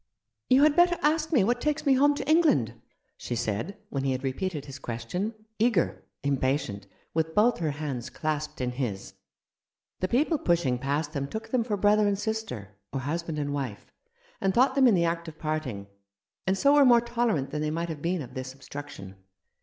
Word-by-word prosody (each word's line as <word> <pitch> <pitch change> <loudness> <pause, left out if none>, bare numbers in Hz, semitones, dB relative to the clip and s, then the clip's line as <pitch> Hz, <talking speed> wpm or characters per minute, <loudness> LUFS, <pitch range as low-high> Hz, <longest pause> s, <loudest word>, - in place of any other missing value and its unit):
"You 260 +2 +6
had 300 -1 +5
better 350 0 +5
ask 310 +2 +2
me 260 -11 +4
what 240 +4 +1
takes 300 +1 -1
me 275 - +5
home 285 +2 +4
to 285 - -5
England," 310 - +3 0.4
she 120 - -4
said, 115 - -2
when 135 -1 -2
he 135 -1 +1
had 130 +1 -4
repeated 145 +3 -3
his 140 -1 -9
question 130 - -4
— 220 0 -49
eager, 225 -6 +1 0.2
impatient, 135 -6 -1 0.3
with 160 0 -1
both 225 +3 +4
her 160 -2 0
hands 140 -4 -4
clasped 150 -1 -3
in 125 -1 -1
his. 120 -7 -4 0.9
The 185 - 0
people 295 - +2
pushing 165 - +1
past 145 +3 -1
them 140 -1 -2
took 220 +7 -6
them 250 -3 +1
for 215 -3 -2
brother 210 +1 +4
and 200 -1 +1
sister, 220 - -4 0.2
or 135 - -3
husband 160 +3 -3
and 145 -1 -2
wife, 130 -8 -5 0.5
and 190 -1 +1
thought 260 +2 +4
them 270 -1 +5
in 225 - +5
the 170 -1 +2
act 170 0 -2
of 160 -1 -9
parting, 155 -11 -3 0.6
and 190 +1 +2
so 280 +7 +4
were 290 -1 +7
more 240 -3 +6
tolerant 235 - 0
than 150 - -2
they 155 - 0
might 170 +2 -2
have 155 -3 -5
been 170 -1 -1
of 125 - -11
this 130 0 -5
obstruction. 135 -9 -9
165 Hz, 200 wpm, -27 LUFS, 135-230 Hz, 0.9 s, were